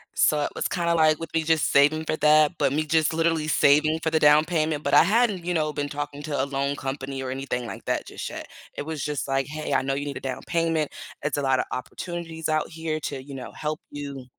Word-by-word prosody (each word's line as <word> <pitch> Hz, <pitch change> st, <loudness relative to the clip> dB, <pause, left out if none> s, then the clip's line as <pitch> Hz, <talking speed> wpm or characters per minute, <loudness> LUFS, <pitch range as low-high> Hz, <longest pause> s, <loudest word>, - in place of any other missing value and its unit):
So 150 Hz, -1 st, +3 dB
it -, -, -1 dB
was -, -, -1 dB
kinda 170 Hz, -1 st, 0 dB
like 155 Hz, -1 st, +4 dB
with 165 Hz, -, -7 dB
me 160 Hz, -1 st, +1 dB
just 160 Hz, -1 st, +2 dB
saving 150 Hz, +3 st, +4 dB
for 155 Hz, -, 0 dB
that, 150 Hz, 0 st, +5 dB
but 135 Hz, -, +1 dB
me 155 Hz, -, +1 dB
just 160 Hz, 0 st, +2 dB
literally 165 Hz, -1 st, +1 dB
saving 155 Hz, +1 st, +4 dB
for 160 Hz, -, 0 dB
the 160 Hz, -, +2 dB
down 150 Hz, +1 st, +6 dB
payment, 155 Hz, -3 st, 0 dB
but -, -, -1 dB
I -, -, +8 dB
hadn't, 205 Hz, -3 st, +2 dB
you 180 Hz, -, 0 dB
know, 155 Hz, -2 st, 0 dB
been 145 Hz, 0 st, -2 dB
talking 145 Hz, 0 st, -5 dB
to 145 Hz, -3 st, -1 dB
a -, -, 0 dB
loan 140 Hz, 0 st, -1 dB
company 135 Hz, -1 st, -4 dB
or 130 Hz, -, -4 dB
anything 130 Hz, -2 st, -3 dB
like -, -, -8 dB
that -, -, -1 dB
just -, -, -6 dB
yet. -, -, -7 dB, 0.3 s
It -, -, -4 dB
was 160 Hz, -2 st, -4 dB
just 150 Hz, -2 st, -2 dB
like, 135 Hz, 0 st, 0 dB
"Hey, 155 Hz, +1 st, -4 dB
I -, -, +3 dB
know 135 Hz, +1 st, -1 dB
you 140 Hz, +1 st, -3 dB
need 140 Hz, -1 st, -4 dB
a -, -, -5 dB
down 130 Hz, -1 st, -4 dB
payment, 165 Hz, -3 st, 0 dB, 0.3 s
it's 145 Hz, -1 st, -1 dB
a -, -, 0 dB
lotta 135 Hz, -2 st, +2 dB
opportunities 165 Hz, +4 st, -5 dB
out 155 Hz, 0 st, 0 dB
here 160 Hz, -1 st, -3 dB
to, 140 Hz, -2 st, -4 dB
you 140 Hz, 0 st, -9 dB
know, 130 Hz, -, -7 dB
help 155 Hz, 0 st, -4 dB
you." 140 Hz, -3 st, -7 dB
150 Hz, 250 wpm, -25 LUFS, 140-160 Hz, 0.3 s, I